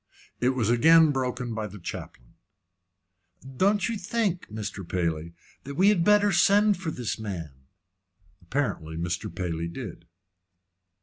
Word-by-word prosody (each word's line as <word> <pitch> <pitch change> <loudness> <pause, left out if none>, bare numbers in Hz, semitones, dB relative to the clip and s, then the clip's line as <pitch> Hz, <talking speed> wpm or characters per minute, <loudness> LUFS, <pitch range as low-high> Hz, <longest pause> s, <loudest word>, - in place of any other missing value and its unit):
It 130 +1 +1
was 115 -3 +1
again 160 +6 +6
broken 125 -3 -2
by 110 -1 -3
the 105 +1 -10
chaplain. - - -8 1.2
"Don't 200 +3 +3
you 230 -2 -2
think, 190 -2 -1
Mr. 105 -2 -5
Paley, 85 -2 -2 0.3
that 140 +1 -7
we 190 +6 +5
had 195 -5 +3
better 205 +1 +4
send 205 +1 +4
for 180 -3 -4
this 120 -7 -4
man?" 90 -8 -5 0.9
Apparently 85 - -3
Mr. 90 +1 -3
Paley 85 -2 -3
did. 85 -3 -8
120 Hz, 130 wpm, -26 LUFS, -, 1.2 s, again